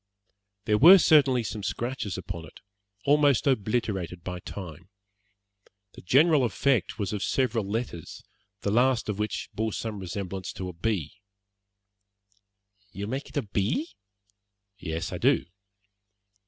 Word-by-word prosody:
There 105 -1 +2
were 175 +7 +10
certainly 140 -8 +4
some 105 0 -5
scratches 120 -2 -3
upon 90 -3 -6
it, - - -16 0.5
almost 145 -1 +4
obliterated 105 - -1
by 90 -1 -5
time. 90 -1 -9 1.0
The - - -12
general 145 - +4
effect 125 +2 +1
was 100 -2 -3
of 105 - -3
several 115 -6 0
letters, 105 -7 -5 0.4
the 100 - -1
last 125 +1 +2
of 105 -1 -3
which 105 0 -3
bore 110 -1 -2
some 110 -3 -4
resemblance 95 0 -5
to 95 -1 -5
a - - -8
B. 95 0 -3 1.7
"You 100 0 -5
make 135 +6 -4
it - - -7
a 145 - +1
B?" 105 - -1 0.9
"Yes, 80 -1 -4
I - - -4
do." - - +3
105 Hz, 130 wpm, -27 LUFS, 95-130 Hz, 1.7 s, were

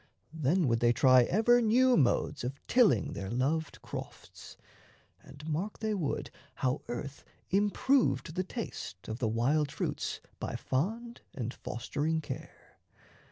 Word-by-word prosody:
Then 160 +2 +2
would 115 -1 +2
they 120 0 +4
try 130 -1 +6
Ever 240 - +4
new 250 +3 +4
modes 130 -3 +1
of 130 +3 -4
tilling 215 - +3
their 95 -1 -5
loved 145 +7 -1
crofts, - - -9 0.6
And 145 +3 -12
mark 170 +7 -2
they 220 -1 -1
would 170 -9 -2 0.2
how 130 +2 0
earth 140 +4 -6 0.3
improved 205 - +2
the 185 - -1
taste 180 - -7
Of 110 +2 -4
the 120 - +1
wild 140 +6 +1
fruits - - -3 0.2
by - - -4
fond 225 - -2
and 120 -1 -3
fostering 145 +7 -2
care. 160 - -9
150 Hz, 135 wpm, -31 LUFS, 125-205 Hz, 0.6 s, try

